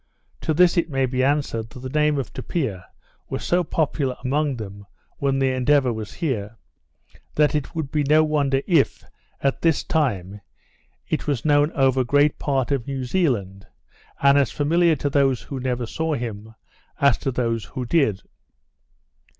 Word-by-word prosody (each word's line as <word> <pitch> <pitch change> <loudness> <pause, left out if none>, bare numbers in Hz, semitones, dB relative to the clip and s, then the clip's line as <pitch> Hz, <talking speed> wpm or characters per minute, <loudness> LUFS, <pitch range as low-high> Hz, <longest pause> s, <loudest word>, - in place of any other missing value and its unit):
To - - -1
this 180 +2 +4
it 170 - +1
may 135 -2 +1
be 130 0 -1
answered, 135 -5 0
that 125 - -11
the 130 - -6
name 150 +2 +1
of 135 - -4
Tupia 110 - -3 0.4
was - - -4
so 175 +1 +2
popular 145 -5 -1
among 145 +1 0
them 100 -3 -9 0.3
when 135 -1 0
the 135 -1 +2
Endeavour 130 0 +2
was 110 -1 -6
here, 115 - -3 0.8
that 150 -1 +3
it 150 +2 -3
would 155 -4 -3
be 150 - +1
no 155 +2 +4
wonder 140 -3 +1
if, 165 -7 +2 0.4
at 135 -1 0
this 165 -3 +2
time, 105 - -1 0.7
it 155 - -2
was 140 -3 -1
known 145 +1 +3
over 135 -1 +2
great 145 +4 +2
part 135 -2 -1
of 135 -5 -1
New 135 -2 -3
Zealand, 120 - -1 0.5
and 140 0 +5
as 140 - +2
familiar 165 +3 +2
to 145 0 -2
those 135 -3 +2
who 135 - -6
never 125 -1 -2
saw 160 +6 -2
him, 110 -3 -6 0.4
as 140 -4 +5
to 140 - -2
those 115 -3 -1
who 125 - -5
did. 120 - +1
135 Hz, 165 wpm, -23 LUFS, 120-150 Hz, 0.8 s, and